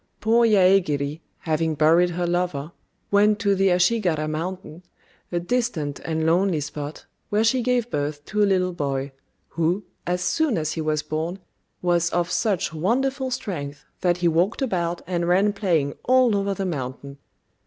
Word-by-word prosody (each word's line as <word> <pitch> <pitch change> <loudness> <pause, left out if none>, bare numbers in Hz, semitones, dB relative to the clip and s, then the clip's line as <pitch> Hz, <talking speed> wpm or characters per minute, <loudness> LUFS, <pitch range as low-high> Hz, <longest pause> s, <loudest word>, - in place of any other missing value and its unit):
Poor 230 +2 +3
Yaégiri, 175 -7 +3 0.2
having 160 0 0
buried 165 +4 +4
her 175 0 -2
lover, 175 -4 -1 0.4
went 205 +1 +4
to 205 -2 +1
the 195 0 +2
Ashigara 180 -4 +2
Mountain, 170 +2 -5 0.5
a 175 - 0
distant 175 - -2
and 160 -1 -2
lonely 175 0 +2
spot, 150 +1 -6 0.2
where 210 +1 +2
she 250 +3 +2
gave 245 -1 0
birth 145 0 -3
to 210 0 -1
a - - +6
little 185 -1 +1
boy, 140 -3 -2 0.4
who, 170 +5 0 0.2
as 180 0 0
soon 300 - +1
as 155 -2 -1
he 160 - -3
was 155 -1 -1
born, 160 +4 -3 0.5
was 175 -1 +2
of 175 0 -1
such 200 -7 0
wonderful 260 - 0
strength 165 - -5
that 175 -1 +1
he 175 -1 +1
walked 175 - +1
about 175 -7 -2
and 175 -1 -1
ran 195 +4 +3
playing 170 -9 0
all 255 -3 +4
over 200 0 0
the 195 - -3
mountain. 140 -3 -5
175 Hz, 160 wpm, -23 LUFS, 155-205 Hz, 0.5 s, a